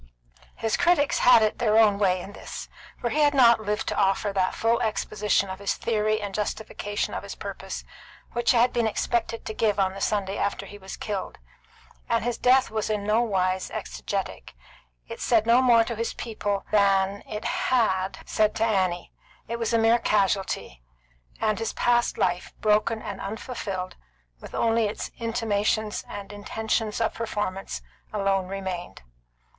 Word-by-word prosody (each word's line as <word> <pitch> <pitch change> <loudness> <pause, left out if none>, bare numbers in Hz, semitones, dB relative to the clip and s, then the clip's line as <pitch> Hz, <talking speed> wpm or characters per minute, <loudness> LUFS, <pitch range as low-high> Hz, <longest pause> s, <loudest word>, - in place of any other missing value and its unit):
His 225 -1 -1
critics 345 -5 +3
had 240 -3 +7
it 215 - 0
their 220 -3 +3
own 210 -3 +5
way 185 -3 +2
in 200 - -9
this, - - -8 0.3
for 240 -2 -2
he 305 - 0
had 290 -1 +4
not 235 -4 +6
lived 210 0 -2
to - - -2
offer 195 +1 +1
that 185 -1 +1
full 230 +1 +2
exposition 210 -2 0
of 190 0 -6
his 200 - -1
theory 215 -1 0
and 205 -2 -5
justification 205 0 -3
of - - -3
his - - -8
purpose - - -6 0.5
which 240 0 0
he 245 - +5
had 240 +2 +4
been 235 -2 +2
expected 230 +1 -1
to 220 - -4
give 210 -2 +1
on 190 -1 +2
the 195 - -8
Sunday 200 -2 -1
after 200 0 -1
he 205 +1 -11
was 190 0 -8
killed; 205 -3 -4 0.7
and 230 -1 +2
his 240 -1 -2
death 255 +1 +4
was 215 -1 -2
in 210 -1 -1
no 215 +3 +3
wise 185 -4 0
exegetic. - - -5 0.5
It - - -8
said 225 -3 +3
no 235 +2 +5
more 235 -3 +6
to 235 0 -4
his 230 +1 -3
people 205 -3 -3
than 200 -1 +3
it 210 -1 -5
had 195 -7 +1
said 215 -1 +1
to 225 - 0
Annie; 185 -5 0 0.4
it 235 +1 -4
was 230 -1 -1
a 230 - +3
mere 225 +1 +4
casualty; 195 - 0 0.6
and 215 0 +1
his 225 - -2
past 240 0 +2
life, 180 -1 -1
broken 215 +1 +2
and 200 -2 -6
unfulfilled, 200 -4 -5 0.4
with - - -10
only 225 -1 +2
its 205 - -5
intimations 220 -2 0
and 200 0 -7
intentions 220 +1 -2
of 225 - +1
performance, 205 -4 -4 0.3
alone 195 -2 0
remained. 185 - -5
215 Hz, 170 wpm, -26 LUFS, 195-230 Hz, 0.7 s, had